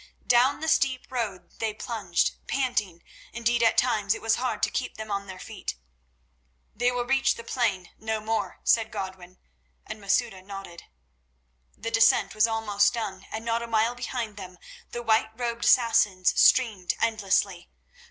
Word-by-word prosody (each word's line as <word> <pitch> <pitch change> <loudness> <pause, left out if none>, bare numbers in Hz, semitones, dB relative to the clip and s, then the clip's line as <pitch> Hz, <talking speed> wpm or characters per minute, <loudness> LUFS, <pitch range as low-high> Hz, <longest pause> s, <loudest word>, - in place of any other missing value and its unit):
Down 250 +5 +3
the 320 - -3
steep 265 -4 +1
road 220 -7 -4
they 220 -2 -2
plunged, 215 -7 -1 0.2
panting; 210 -10 -1 0.3
indeed 235 0 +1
at 230 - +3
times 215 -4 +2
it - - -9
was 225 0 +3
hard 255 +1 -2
to - - +2
keep 255 - -3
them 215 -1 -7
on 200 0 -2
their 190 -1 -8
feet. 200 - -6 1.0
"They 245 +1 +2
will 245 -1 -2
reach 270 +1 +2
the 230 - -9
plain—no 220 -1 -2
more," 215 -3 -3
said 225 -1 +3
Godwin, 185 -1 -7 0.5
and 215 - -8
Masouda 200 0 0
nodded. 195 -3 -9 0.9
The 230 +2 -5
descent 225 0 +4
was 215 +1 +4
almost 220 -1 +1
done, 195 -5 -5
and 220 +1 -5
not 230 0 0
a 235 - -5
mile 225 +1 +2
behind 240 -3 -5
them 185 -2 -9 0.3
the 240 - -6
white 220 -1 +3
robed 235 -1 -2
Assassins 210 -6 +4
streamed 210 -8 +4
endlessly. 200 -5 0
220 Hz, 155 wpm, -26 LUFS, 195-235 Hz, 1.0 s, descent